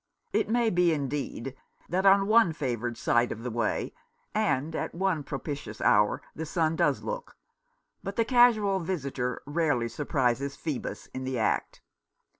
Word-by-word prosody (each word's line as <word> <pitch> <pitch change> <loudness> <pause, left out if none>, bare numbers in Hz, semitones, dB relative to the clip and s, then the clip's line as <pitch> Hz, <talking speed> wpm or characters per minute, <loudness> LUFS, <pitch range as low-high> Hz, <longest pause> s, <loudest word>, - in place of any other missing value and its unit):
It - - +1
may 235 -1 +2
be 175 -1 +3
indeed 135 -3 -3 0.3
that 190 +3 +1
on 195 0 +6
one 215 -5 +5
favoured 120 -5 -3
side 120 +1 +2
of 115 - -6
the 125 - -3
way 115 -1 -1 0.4
and 160 -8 0
at - - -3
one 185 -3 0
propitious 140 -6 -6
hour 105 0 +3
the 160 - -4
sun 160 -1 +1
does - - +1
look; - - -5 0.7
but 195 0 -5
the 230 - +2
casual 225 -6 +4
visitor 140 -8 -3
rarely 145 -6 +1
surprises 140 -1 0
Phoebus 150 -6 -4
in 130 - -4
the 130 -1 -2
act. 110 - -1
150 Hz, 150 wpm, -28 LUFS, 125-190 Hz, 0.7 s, on